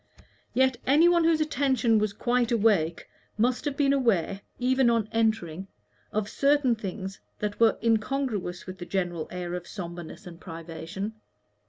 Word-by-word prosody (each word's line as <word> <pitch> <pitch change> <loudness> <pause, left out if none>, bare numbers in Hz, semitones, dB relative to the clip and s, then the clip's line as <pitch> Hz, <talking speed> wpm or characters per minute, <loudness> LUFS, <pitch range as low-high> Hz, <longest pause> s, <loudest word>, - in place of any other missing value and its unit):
Yet 260 -1 +3
any 300 +6 +6
one 345 -1 +4
whose 325 -1 +3
attention 260 -6 +2
was 210 -1 0
quite 240 +3 0
awake 200 -8 +2 0.3
must 245 +5 +1
have 285 -2 -2
been 280 -1 +3
aware, 205 -7 +1 0.2
even 260 0 +3
on 230 -2 +1
entering, 215 -6 0 0.4
of 210 -1 -1
certain 280 0 +3
things 195 -3 -5 0.2
that 210 -1 -3
were 225 -1 +5
incongruous 225 -5 0
with 185 0 -8
the 175 - -6
general 175 -4 -2
air 180 -1 -5
of 180 -1 -5
sombreness 175 0 -7
and 170 -2 -10
privation. 165 +4 -6
220 Hz, 150 wpm, -27 LUFS, 180-255 Hz, 0.4 s, any